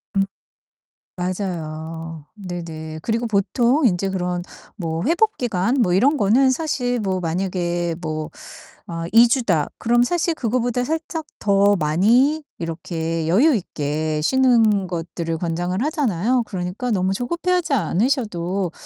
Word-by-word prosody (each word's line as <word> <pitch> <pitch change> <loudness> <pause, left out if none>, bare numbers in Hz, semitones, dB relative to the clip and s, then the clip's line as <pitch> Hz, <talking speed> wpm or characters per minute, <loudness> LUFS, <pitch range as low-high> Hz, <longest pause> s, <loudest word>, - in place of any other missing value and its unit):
음. 195 - +4 0.9
맞아요. 165 -4 -5
네네. 165 -5 -7
그리고 230 +1 -1
보통 240 +7 +2
인제 195 -2 +1
그런 180 -1 -2 0.3
뭐 165 -3 -3
회복 370 +8 +2
기간 230 -1 0
뭐 180 -7 +2
이런 260 - +4
거는 255 +4 +4
사실 255 -4 -1
뭐 190 -4 -1
만약에 175 0 -1
뭐 155 -2 -4 0.6
어 165 -1 -4
'2 230 +1 +7
주다.' 205 - +1
그럼 240 +1 +3
사실 335 +5 +1
그거보다 245 -1 0
살짝 320 +3 -3
더 200 0 +3
많이 225 - +3 0.2
이렇게 165 -1 -3
여유 260 - +4
있게 155 -5 -2
쉬는 225 -3 +3
것들을 165 -1 -4
권장을 175 +3 -2
하잖아요. 250 - +1
그러니까 190 +5 -4
너무 190 -2 +1
조급해하지 340 - -1
않으셔도 195 - 0
195 Hz, 260 characters per minute, -21 LUFS, 170-245 Hz, 0.9 s, 2